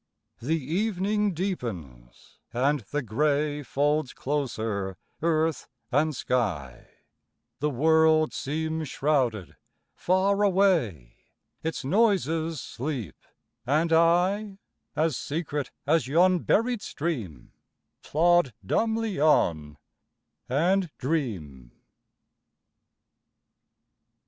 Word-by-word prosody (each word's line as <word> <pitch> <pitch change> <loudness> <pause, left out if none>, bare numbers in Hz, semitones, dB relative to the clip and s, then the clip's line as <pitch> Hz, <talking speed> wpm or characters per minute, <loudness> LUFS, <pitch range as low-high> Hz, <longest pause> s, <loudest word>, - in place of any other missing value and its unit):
The 155 +7 0
evening 200 +6 0
deepens, 90 - -6
and 140 +4 +1
the 140 +6 -4
gray 145 +5 0
Folds 145 +1 0
closer 110 -9 -3 0.2
earth 160 -1 0 0.2
and 150 +3 +2
sky; 90 - -2 0.7
The 150 - +1
world 155 +3 +3
seems 160 +1 -3
shrouded 130 - 0 0.4
far 195 +3 +1
away; 175 - +1 0.4
Its 160 -4 -4
noises 165 - +1
sleep, 120 - -5 0.5
and 155 +6 +1
I, 180 +5 +2 0.4
As 160 -2 +1
secret 150 -3 -3 0.2
as 155 0 +2
yon 180 +5 +4
buried 230 +5 +1
stream, 120 - -5 0.5
Plod 170 -4 +3
dumbly 220 - 0
on, 80 - +2 0.7
and 175 +7 +2
dream. 95 - -3
150 Hz, 80 wpm, -26 LUFS, 125-170 Hz, 0.7 s, yon